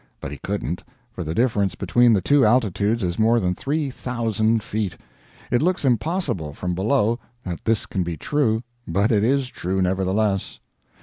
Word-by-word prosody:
But - - -6
he 75 - -7
couldn't, 95 -3 -3 0.3
for 90 - -5
the 80 +1 -4
difference 100 -6 +1
between 120 +4 +3
the 100 -5 +2
two 140 +7 +4
altitudes 110 -1 +2
is 90 +1 -2
more 115 +2 +4
than 90 -3 0
three 145 - -2
thousand 115 -3 0
feet. 105 -4 -3 0.5
It 120 - +3
looks 175 -2 +1
impossible, 120 - 0
from 90 -1 -3
below, 110 +4 +1 0.2
that 90 -3 -5
this 115 -2 +1
can 95 - -2
be 85 -2 -3
true, 115 - 0 0.2
but 100 +6 +1
it 105 -2 +3
is 135 +2 +2
true, 95 -4 -2
nevertheless. 95 +2 0
110 Hz, 170 wpm, -23 LUFS, 95-120 Hz, 0.5 s, two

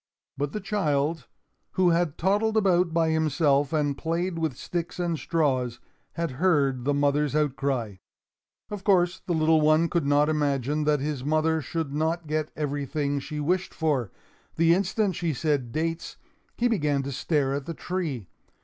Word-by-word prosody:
But 145 +1 -2
the 210 - -3
child, 160 - -1 0.5
who 180 -2 +3
had 165 -3 +1
toddled 210 +5 +1
about 180 -4 +3
by 165 -1 +2
himself 150 -3 +2
and 145 -3 0
played 170 +3 -2
with 155 -6 -2
sticks 170 -1 -4
and 175 -2 0
straws, 130 -7 0 0.3
had 170 -3 -2
heard 140 -8 +2
the 145 - +2
mother's 145 0 +1
outcry. 135 -8 -1 0.7
Of 205 -2 -5
course 180 -3 +2
the 175 - -1
little 160 0 +3
one 155 +2 +4
could 170 -5 0
not 145 +1 +4
imagine 145 -1 0
that 150 -2 +2
his 145 -3 -3
mother 155 +2 +1
should 155 0 -4
not 160 +3 -1
get 155 0 -2
everything 145 -1 -2
she 150 +2 -6
wished 180 +5 -1
for. 140 - 0 0.4
The 165 +1 +4
instant 195 +1 0
she 165 -4 -1
said 140 -5 -1
dates, 165 +3 -3 0.4
he 245 - +2
began 150 - +1
to 140 - -4
stare 135 0 0
at 140 -1 -4
the 165 - -4
tree. 155 - -3
155 Hz, 160 wpm, -26 LUFS, 140-170 Hz, 0.7 s, one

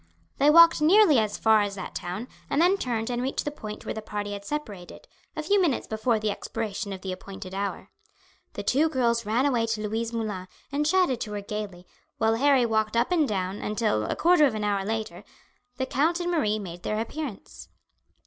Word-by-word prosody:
They 285 +2 +5
walked 335 +1 +7
nearly 330 - +6
as 215 -2 -1
far 220 -1 +4
as 200 -1 -2
that 185 - -7
town, 185 +7 -5 0.2
and 280 - +1
then 360 +4 +5
turned 240 - -2
and 240 0 -1
reached 265 +2 -2
the 295 - -2
point 215 -8 -8
where - - -3
the 220 - -5
party 205 -1 -4
had 200 0 -6
separated, 205 -9 -6 0.3
a 310 - -3
few 400 +5 +3
minutes 320 -8 +1
before 220 +1 0
the 215 -1 -1
expiration 205 -1 -4
of 190 -1 -6
the 190 - -4
appointed 190 0 -8
hour. 200 +1 -4 0.6
The - - -5
two 300 +5 +2
girls 235 -5 0
ran 235 +5 +2
away 240 -5 +1
to 215 -2 -2
Louise 225 +2 -2
Moulin, 210 -5 -4 0.2
and 295 +2 0
chatted 350 -8 +2
to 210 - -4
her 205 - -3
gaily, 200 -3 -6 0.3
while 220 0 +2
Harry 265 +1 +4
walked 220 0 0
up 235 +8 +1
and 320 -5 +3
down 190 -1 -2
until, 210 - 0
a - - -2
quarter 335 -3 +5
of 235 - -3
an 215 - -3
hour 200 -1 0
later, 220 +2 -4 0.5
the 260 - -1
count 315 +7 +1
and 350 0 -1
Marie 215 -11 +1
made 175 -4 -7
their 215 +3 -2
appearance. 240 0 -6
225 Hz, 205 wpm, -26 LUFS, 205-285 Hz, 0.6 s, walked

